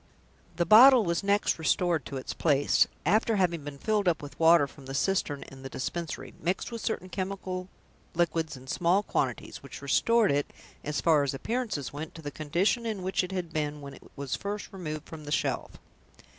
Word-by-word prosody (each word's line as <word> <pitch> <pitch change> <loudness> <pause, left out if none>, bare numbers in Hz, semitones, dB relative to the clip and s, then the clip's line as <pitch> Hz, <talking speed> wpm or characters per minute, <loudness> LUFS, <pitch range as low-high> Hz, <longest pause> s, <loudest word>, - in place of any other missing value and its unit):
The 170 - +1
bottle 245 +6 +8
was 170 0 0
next 200 -3 +1
restored 170 0 +1
to 140 - -5
its 130 - -5
place, 145 -3 +3 0.2
after 215 +6 +3
having 175 -5 +1
been 145 -1 -7
filled 210 +4 0
up 165 -3 +3
with 145 - -10
water 165 -2 +6
from 140 -1 -13
the 135 - -5
cistern 145 -3 0
in 135 0 -13
the 135 - -7
Dispensary, 165 +5 -5
mixed 180 +8 -1
with 230 -1 -5
certain 185 -4 -2
chemical 185 -1 -4 0.5
liquids 165 -3 0
in 130 - -13
small 175 +8 +2
quantities, - - -2
which - - -10
restored 230 -5 +3
it 145 0 0 0.3
(so 150 - -3
far 155 0 +3
as 140 -1 -1
appearances 220 - -3
went) 150 +2 -7
to 160 - -10
the 145 - -4
condition 170 +11 0
in 210 -4 -3
which 190 0 0
it 180 - -5
had 180 -4 -4
been 150 -1 -2
when 140 -1 -9
it - - -13
was 140 -2 -3
first 205 0 -5
removed 155 -5 -6
from 155 -2 -9
the 145 - -6
shelf. - - -1
170 Hz, 195 wpm, -28 LUFS, 145-195 Hz, 0.5 s, bottle